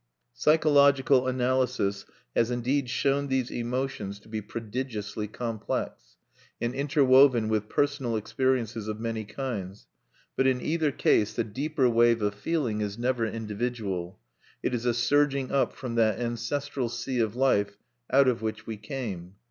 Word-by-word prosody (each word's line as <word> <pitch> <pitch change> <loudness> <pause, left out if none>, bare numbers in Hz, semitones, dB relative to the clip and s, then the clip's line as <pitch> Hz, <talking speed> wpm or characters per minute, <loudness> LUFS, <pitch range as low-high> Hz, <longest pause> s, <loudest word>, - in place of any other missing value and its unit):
Psychological 140 -4 +4
analysis 125 -5 0 0.3
has 115 - +3
indeed 125 +2 0
shown 135 +3 +1
these 130 -2 -1
emotions 120 -5 -3
to - - -19
be 110 -1 -3
prodigiously 110 -1 -5
complex, 115 0 -4 0.4
and 120 +1 -1
interwoven 135 -4 +4
with 105 -1 -1
personal 140 -5 0
experiences 115 -1 -1
of 110 0 -4
many 115 -1 -3
kinds; 105 -5 -5 0.5
but 135 - +2
in 130 -1 +2
either 155 +1 0
case 105 -5 +2
the 115 - +1
deeper 135 +5 0
wave 115 -1 +3
of 105 0 +1
feeling 115 -1 -1
is 105 0 -3
never 120 -1 0
individual: 105 -5 -4 0.5
it - - 0
is 120 0 -2
a 120 - +3
surging 140 +2 +2
up 140 - +2
from 125 -3 -6
that 110 -3 +2
ancestral 120 +2 -2
sea 120 +2 -3
of 110 -1 0
life 100 -6 +2 0.3
out 135 +1 +5
of 125 -3 +1
which 110 -1 -4
we 110 -1 -5
came. 100 - -6
120 Hz, 145 wpm, -27 LUFS, 110-135 Hz, 0.5 s, out